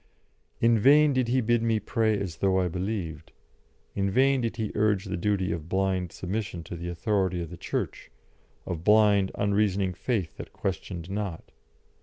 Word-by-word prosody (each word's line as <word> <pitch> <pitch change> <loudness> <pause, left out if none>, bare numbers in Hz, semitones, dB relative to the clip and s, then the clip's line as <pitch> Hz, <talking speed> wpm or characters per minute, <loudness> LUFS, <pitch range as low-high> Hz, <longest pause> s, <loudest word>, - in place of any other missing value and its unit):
In 115 -1 +4
vain 145 +5 +6
did 130 -2 +1
he 130 +2 +2
bid 120 0 +2
me 115 -1 +1
pray 110 0 0
as 90 -5 -5
though 95 -1 +2
I 90 - +1
believed; 85 -4 -4 0.6
in 100 0 0
vain 135 +5 +3
did 115 -1 -2
he 110 -3 -2
urge 105 -1 +1
the 95 -1 -3
duty 95 +1 0
of 85 -1 -5
blind 95 -2 0
submission 95 -2 -4
to 85 - -7
the 85 +1 -5
authority 95 0 0
of 85 -1 -5
the - - -6
Church, - - -4 0.6
of 85 -2 -4
blind, 105 -1 +5
unreasoning 100 -2 +1
faith 95 -2 -2
that - - -9
questioned 95 -2 -4
not. 100 -5 -4
100 Hz, 170 wpm, -27 LUFS, 90-110 Hz, 0.6 s, vain